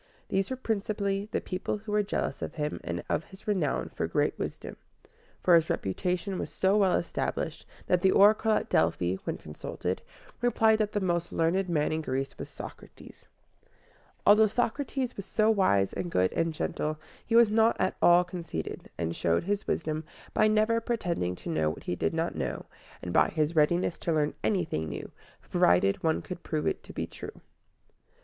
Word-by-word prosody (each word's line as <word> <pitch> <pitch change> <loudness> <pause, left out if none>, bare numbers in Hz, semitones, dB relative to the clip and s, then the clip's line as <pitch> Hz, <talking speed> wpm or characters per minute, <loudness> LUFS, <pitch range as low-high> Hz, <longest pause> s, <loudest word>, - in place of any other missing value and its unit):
These 195 0 0
were 260 - -2
principally 205 -4 -2
the - - 0
people 185 +2 -3
who 210 +1 -8
were 210 0 +3
jealous 205 - -2
of - - -5
him 150 -2 -3
and 85 0 -4
of 150 - -1
his 190 +2 -16
renown 185 -8 0
for - - -3
great - - +1
wisdom; - - -5 0.7
for 180 - +5
his 165 -1 +5
reputation 180 - -1
was - - -3
so 190 +1 +2
well 195 -3 +4
established, - - -3 0.2
that 180 -1 +2
the 190 - +5
oracle 215 +3 +5
at - - 0
Delphi, 90 +2 +1
when - - -2
consulted, 90 +4 -5 0.4
replied 220 -2 +3
that 210 -1 0
the 205 - +1
most 175 -3 -1
learned 175 +3 +1
man 150 -3 +1
in 160 0 -1
Greece 135 -2 -3
was - - -6
Socrates. - - -11 1.0
Although 215 +1 +7
Socrates 250 +3 -1
was 200 -1 -7
so 215 +2 +3
wise 100 - +2
and 175 - -3
good 95 - +1
and 165 0 +1
gentle, 155 0 -2 0.3
he 230 - -1
was 230 -2 +7
not 225 +1 +4
at 185 - +1
all 175 +1 +7
conceited, 170 - -6
and 85 0 -2
showed 85 0 +1
his 205 +3 -2
wisdom 155 -1 -1 0.3
by 215 - +4
never 215 +2 +3
pretending 175 - -1
to - - -8
know 80 -1 +1
what 80 - -7
he 90 - -2
did 80 -2 -1
not - - 0
know, - - -3 0.4
and 90 - -4
by - - +5
his 155 +1 0
readiness 165 +3 +2
to 170 - -1
learn 150 -2 +1
anything 160 - 0
new, 70 - -6 0.4
provided 90 +3 +3
one 160 -1 +1
could 180 -1 -7
prove 155 -2 -2
it - - 0
to - - -12
be - - -3
true. - - -10
180 Hz, 185 wpm, -29 LUFS, 150-210 Hz, 1.0 s, Although